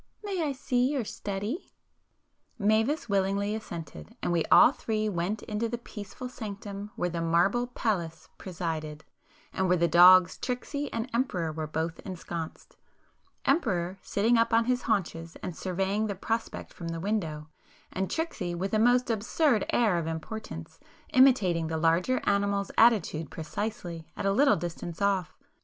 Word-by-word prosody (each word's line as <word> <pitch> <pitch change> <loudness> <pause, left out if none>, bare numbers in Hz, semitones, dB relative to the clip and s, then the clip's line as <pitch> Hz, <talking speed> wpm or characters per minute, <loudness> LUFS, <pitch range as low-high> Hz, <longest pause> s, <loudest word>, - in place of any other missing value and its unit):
May 390 -4 -2
I - - -6 0.2
your 250 0 +2
study?" 205 - -4 0.9
Mavis 225 +7 +1
willingly 200 0 +1
assented,—and 165 - -6
we 170 -2 +2
all - - +7
three 215 -5 -2
went 195 +2 -2
into 215 +2 -2
the 240 - -3
peaceful 220 +1 -8
sanctum 205 -3 -7
where 180 - -1
the 170 0 -3
marble 175 +9 +2
Pallas 190 -9 -2
presided, 160 -4 -4 0.5
and 190 - 0
where 180 - +4
the 170 0 +3
dogs 180 +2 +7
Tricksy 280 +3 -3
and 230 +1 -2
Emperor 185 -10 0
were 155 0 -4
both 160 +2 -3
ensconced,—Emperor 180 - -4
sitting 230 +3 +2
up 230 - +2
on 230 0 +4
his 250 0 +1
haunches 170 -7 -2
and 175 - -4
surveying 195 +4 -1
the 200 - -3
prospect 225 +4 -3
from 170 - -7
the 165 0 -3
window, 165 -6 -2 0.4
and 190 0 -2
Tricksy 210 - -3
with 195 +4 -3
a 215 - +3
most 245 +2 +4
absurd 225 +2 +1
air 215 -8 +3
of 165 - -4
importance, 160 -2 -6 0.3
imitating 200 -11 +4
the 160 0 -2
larger 170 +10 +2
animal's 200 0 +1
attitude 185 - +3
precisely, 170 -1 -5
at - - -3
a 195 - +3
little 280 +6 +5
distance 170 0 -5
off. 195 -4 0
200 Hz, 145 wpm, -28 LUFS, 170-230 Hz, 0.9 s, all